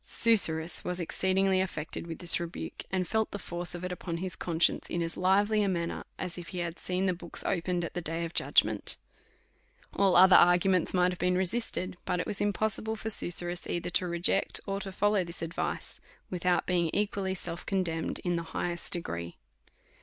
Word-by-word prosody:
Susurrus 170 -8 +4
wa§ 180 0 -4
exceedingly 190 +2 +1
affected 165 -3 -4
with 165 -1 -6
this 175 -1 +2
rebuke, 170 0 -6
and 185 -2 -1
felt 220 +2 0
the - - -5
force 175 -2 -2
of 175 - -7
it 180 - -3
upon 175 -1 -4
his 185 +1 -3
conscience 170 -1 0
in 175 - -2
as 165 0 -4
lively 205 +4 +2
a 200 - +1
manner, 170 -2 -2
as 180 -1 -5
if 170 - -9
he 180 - -7
had 170 -1 -4
seen 185 +1 -1
the 185 - +2
books 175 -1 -7
opened 175 -1 -1
at - - -7
the 175 - -3
day 165 +1 -2
of 165 - -7
judgment. - - +2 1.0
All 195 -2 +3
other 185 +1 +8
arguments 180 +1 +4
might 180 0 +3
have 180 - -7
been 180 0 +1
resisted; 190 -1 -1
but 180 - -1
it - - -2
was 205 - -3
impossible 215 +2 0
for 220 +1 -5
vSusurrus 175 -3 +1
either 175 0 -2
to 180 - +1
reject, 175 +3 +1
or 195 0 -2
to 195 -1 -6
follow 205 0 +1
this 170 0 -4
advice, 165 +2 -4 0.3
without 180 0 +1
being 175 -2 +1
equally 200 -2 -1
self 170 -1 -3
condemned 170 -4 -2
in 175 -1 0
the - - -2 0.2
highest 175 -1 -2
degree. 85 - -2
180 Hz, 190 wpm, -29 LUFS, 170-190 Hz, 1.0 s, other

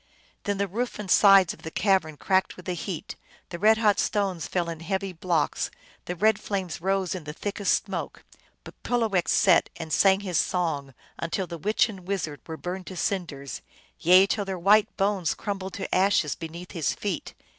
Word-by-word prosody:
Then 205 -1 0
the 200 0 0
roof 235 +6 -3
and 200 -3 -4
sides 195 -3 +6
of - - -16
the 160 - -6
cavern 185 -5 +1
cracked 190 +3 +1
with 180 - -12
the 180 - -2
heat, 175 0 -5 0.3
the 170 - -6
red 220 +3 +5
hot 210 -3 +3
stones 195 -5 0
fell 175 -2 -1
in 165 -1 -5
heavy 190 +3 -3
blocks, 165 -3 0 0.4
the 180 - -4
red 215 +3 +3
flames 185 -5 -4
rose 190 0 0
in 180 -5 -6
the 150 - -6
thickest 200 +3 0
smoke, - - -5 0.4
but - - -11
Pulowech 220 -7 0
sat 185 -3 +4
and 160 -1 -6
sang 195 0 +4
his 180 -5 0
song 145 -7 -1 0.2
until 165 +3 -2
the 170 -1 -8
witch 210 +10 +2
and 190 -5 -10
wizard 165 -7 -3
were 160 -1 -6
burned 180 +2 -5
to 185 - -7
cinders; 155 -8 -3 0.4
yea, 185 +3 +7
till 205 +1 -1
their 195 -1 -4
white 200 +4 +3
bones 195 -4 +1
crumbled 195 -3 -5
to 195 - -5
ashes 185 -5 +3
beneath 170 +2 -8
his 165 -7 -1
feet. 200 -5 -4
185 Hz, 190 wpm, -26 LUFS, 170-200 Hz, 0.4 s, yea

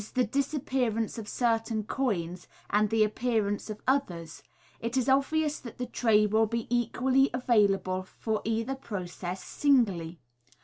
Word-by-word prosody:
the 255 - +4
disappearance 250 -3 -1
of 215 - -7
certain 225 -2 0
coins 185 -8 -2 0.2
and 210 +1 +3
the 220 0 +3
appearance 215 -2 -1
of 215 0 -7
others 175 - -1 0.2
— - - -30
it 235 +3 -2
is 255 0 +1
obvious 295 +3 +2
that 235 - -10
the 250 - -3
tray 225 -3 +3
will 220 +1 +3
be 230 +1 -2
equally 255 +3 +2
available 200 -6 +2
for 215 +3 -3
either 225 +3 -1
process 185 -7 -6
singly. 195 - +1
225 Hz, 140 wpm, -29 LUFS, 205-255 Hz, 0.2 s, the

